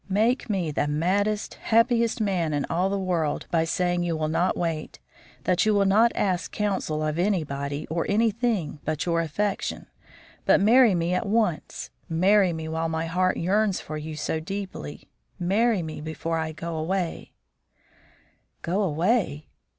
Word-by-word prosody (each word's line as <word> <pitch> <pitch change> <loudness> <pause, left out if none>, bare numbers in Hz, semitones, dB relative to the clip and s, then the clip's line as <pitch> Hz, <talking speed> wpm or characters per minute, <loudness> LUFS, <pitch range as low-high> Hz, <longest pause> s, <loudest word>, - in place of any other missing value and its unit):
Make 225 +6 +1
me 185 -6 0
the 145 - 0
maddest, 200 +8 0
happiest 230 0 +2
man 180 -7 0
in 145 - 0
all 180 +3 +1
the 200 - -1
world 175 -6 -1
by 165 -2 +2
saying 175 +1 0
you 170 -2 -1
will 155 0 -1
not 165 +3 +1
wait; 165 -3 -3 0.5
that 185 +1 +2
you 215 -1 +3
will 200 -1 +3
not 220 +4 +5
ask 185 -3 0
counsel 190 -7 -1
of 155 +2 -2
anybody 145 -7 -1
or 165 +1 -2
anything 215 - 0
but 155 -1 -2
your 170 -1 +1
affection, 195 +5 -2 0.6
but - - +5
marry 225 +1 +6
me 170 +1 0
at 200 +4 -1
once; 210 -6 -1 0.2
marry 185 +3 +4
me 160 -1 -5
while 160 +1 -2
my 160 0 -2
heart 185 +2 +1
yearns 200 +2 +1
for 155 - -7
you 155 +1 -5
so 150 +1 -2
deeply; 185 - -6 0.3
marry 200 +2 +2
me 155 -1 -6
before 160 +1 -3
I 160 0 -2
go 165 +1 -5
away 175 +2 -2 0.6
" - - -34
"Go 185 +5 0
away?" 170 - 0
175 Hz, 160 wpm, -25 LUFS, 160-205 Hz, 0.6 s, marry